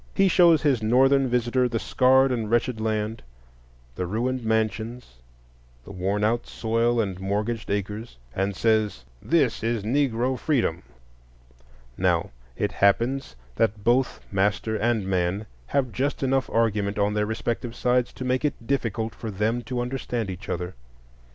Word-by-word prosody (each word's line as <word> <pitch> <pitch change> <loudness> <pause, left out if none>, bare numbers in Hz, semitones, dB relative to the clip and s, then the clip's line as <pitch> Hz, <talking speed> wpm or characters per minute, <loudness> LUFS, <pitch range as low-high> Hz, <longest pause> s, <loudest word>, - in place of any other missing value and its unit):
He 195 -1 +4
shows 170 -4 +5
his 135 -6 +2
Northern 135 +4 +4
visitor 125 +1 +1
the 115 - -1
scarred 130 +3 +4
and 115 -4 -2
wretched 120 0 +1
land; 110 0 -1 0.7
the 90 +7 -3
ruined 120 +6 -1
mansions, 110 - -2 0.7
the 100 - -11
worn 100 +2 -1
out 115 +2 +1
soil 115 +1 0
and 95 -4 -1
mortgaged 105 +4 -2
acres, 105 - -3 0.2
and 95 +1 -1
says, 110 - +1 0.2
This 145 -8 +1
is 115 -1 -1
Negro 125 +1 +1
freedom! 120 - 0 1.2
Now - - +1 0.3
it - - 0
happens 115 - +1 0.2
that 110 -2 +1
both 125 +3 +2
master 105 +3 0
and 110 -1 0
man 95 +2 0 0.2
have 130 -4 0
just 140 +4 -2
enough 135 0 +1
argument 105 -3 +1
on 105 0 +1
their 105 0 0
respective 115 +1 -3
sides 125 -1 +1
to 130 - -6
make 130 +2 0
it 140 -5 -2
difficult 115 -4 -1
for 115 - -6
them 110 +4 0
to 125 -1 -2
understand 120 -4 -3
each 95 +1 -9
other. 90 +1 -3
115 Hz, 145 wpm, -25 LUFS, 105-125 Hz, 1.2 s, shows